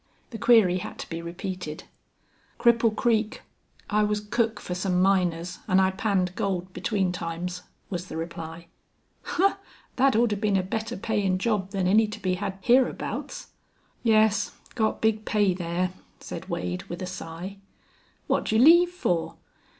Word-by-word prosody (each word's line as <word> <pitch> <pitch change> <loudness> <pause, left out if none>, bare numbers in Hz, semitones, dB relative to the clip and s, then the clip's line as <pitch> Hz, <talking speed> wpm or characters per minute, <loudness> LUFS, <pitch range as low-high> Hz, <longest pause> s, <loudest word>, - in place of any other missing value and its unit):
The 225 - -6
query 205 -6 +5
had - - -7
to - - -7
be 165 0 -4
repeated. 175 -2 -6 0.8
"Cripple 230 -2 +4
Creek. 220 -2 0 0.4
I 210 0 +2
was 210 0 +1
cook 220 +1 -1
for 180 - -5
some 180 0 0
miners 180 -2 +1
an' 185 -2 +4
I 190 0 +3
panned 190 -2 0
gold 185 -1 -2
between 195 -5 0
times," 175 +1 -4 0.3
was 180 0 -4
the - - -6
reply. 165 0 -6 0.7
"Humph! 395 +2 +3 0.4
Thet 270 -1 +4
oughter 225 -2 +3
been 205 -1 +1
a 185 - +1
better 220 +3 -3
payin' 200 -2 0
job 195 -1 0
than 195 -2 -1
any 215 +4 +4
to 210 +1 -7
be 185 -3 0
hed 195 +1 -3
hereabouts." 255 - 0 0.5
"Yes, 215 -2 +3 0.2
got 220 -3 0
big 220 -1 +2
pay 205 -4 +2
there," 175 0 -2 0.3
said - - -8
Wade, 90 0 -3
with 175 +2 -6
a - - -2
sigh. 180 +1 -7 0.7
"What'd - - 0
you 220 - +3
leave 340 +8 +7
fer?" 180 - -1
195 Hz, 155 wpm, -26 LUFS, 180-220 Hz, 0.8 s, leave